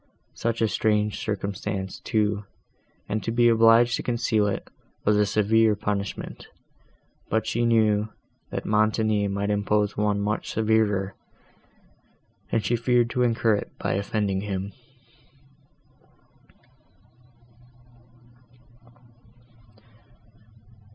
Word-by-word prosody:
Such 115 0 -1
a - - +4
strange 105 -1 0
circumstance, 100 -1 -4
too, 105 -1 0 0.6
and 110 +1 -2
to - - -3
be 120 +1 +4
obliged 115 +1 +5
to - - -4
conceal 115 -3 +1
it, 100 - -3 0.4
was 105 - +4
a 105 0 +3
severe 110 +1 +3
punishment; 100 -1 -4 0.8
but 110 +1 0
she 120 +1 0
knew, 110 -2 +2 0.4
that - - -5
Montoni 110 -1 +2
might 100 +1 -1
impose 105 0 +1
one 105 -1 +1
much 105 +1 -2
severer, 105 -3 +1 1.4
and 110 -3 0
she 120 - +2
feared 120 0 +2
to 125 - -1
incur 115 -2 +2
it - - -7
by - - -2
offending 100 -1 -1
him. 100 -1 -4
105 Hz, 100 wpm, -25 LUFS, 100-115 Hz, 1.4 s, obliged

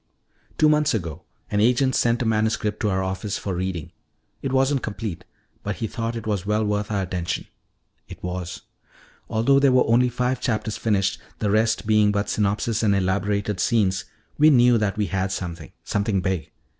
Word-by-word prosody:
Two 155 - +5
months 150 -3 +3
ago 85 -8 -4 0.3
an 105 - +1
agent 125 +4 +3
sent 120 +1 +2
a - - -3
manuscript 110 -1 0
to 105 - 0
our 95 -1 0
office 95 +2 -3
for 100 - -4
reading. 90 -3 -3 0.5
It 135 - -2
wasn't 135 +1 +2
complete, 105 -5 -5 0.4
but 105 0 -3
he 115 - -3
thought 115 +1 -3
it 115 - -6
was 105 -4 -1
well 105 +2 0
worth 105 0 -1
our 100 -2 0
attention. 90 -1 -3 0.6
It - - -11
was. 90 -1 -5 0.7
"Although 120 +5 +3
there 140 -1 +4
were 125 0 +4
only 120 +2 +3
five 125 +1 -1
chapters 110 -3 -1
finished, 100 -4 0 0.2
the 105 - 0
rest 110 +1 +2
being 105 -1 +4
but 100 0 -1
synopsis 105 +2 0
and 105 -3 +3
elaborated 100 +1 0
scenes, 100 +1 +1 0.3
we 155 +1 +7
knew 120 -4 +5
that 105 -1 -1
we 105 - +1
had 95 -1 -1
something 85 -5 -5
something 100 -1 0
big. 95 -3 -2
105 Hz, 180 wpm, -23 LUFS, 95-115 Hz, 0.7 s, we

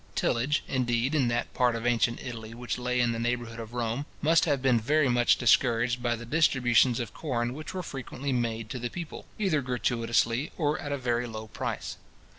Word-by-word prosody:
Tillage, 130 +6 +1
indeed, 125 +1 0
in 140 -5 +3
that 120 0 -1
part 125 -2 +2
of 115 0 -4
ancient 120 0 +2
Italy 115 -3 -7
which 125 +1 -4
lay 125 0 0
in 120 -1 +3
the 115 - -3
neighbour 120 +1 0
hood 115 0 -9
of 115 +1 -8
Rome, 120 +4 -2
must 160 +2 +4
have 145 -4 +1
been 130 -3 +3
very 145 +6 +2
much 120 0 +4
discouraged 120 0 +3
by 120 -1 +1
the 120 +1 -8
distributions 125 -4 +3
of 120 - -4
corn 120 -5 -2
which 155 +5 -7
were 185 - -3
frequently 135 -1 -4
made 115 -2 -1
to 125 - -4
the 120 0 -3
people, 170 0 -7
either 185 -8 +1
gratuitously, 120 +1 0
or 150 -2 0
at 145 - -5
a 140 - 0
very 120 -2 -1
low 110 -1 -6
price. - - -4
120 Hz, 205 wpm, -28 LUFS, 120-135 Hz, -, must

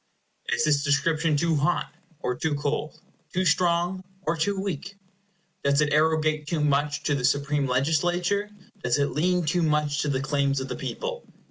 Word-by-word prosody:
Is - - +2
this 145 -2 +3
description 155 +2 +2
too 165 +1 +1
hot, 150 +5 0 0.3
or 125 - 0
too 150 +4 -1
cold; 145 +1 -3 0.3
too 185 +1 0
strong, 175 +2 +2 0.2
or 165 -1 0
too 190 +5 0
weak? 195 0 -4 0.7
Does 140 +1 +3
it 150 -1 +2
arrogate 155 -1 +2
too 165 0 -1
much 145 0 +1
to 145 - +1
the 135 -3 -1
supreme 140 +1 +1
legislature? 175 +9 +1 0.3
Does 125 +1 +2
it 140 0 +1
lean 180 +2 +1
too 175 +3 +1
much 150 -2 +1
to - - -1
the 135 -2 0
claims 140 -1 0
of 130 - -5
the - - -3
people? - - -5
150 Hz, 170 wpm, -26 LUFS, 145-175 Hz, 0.7 s, this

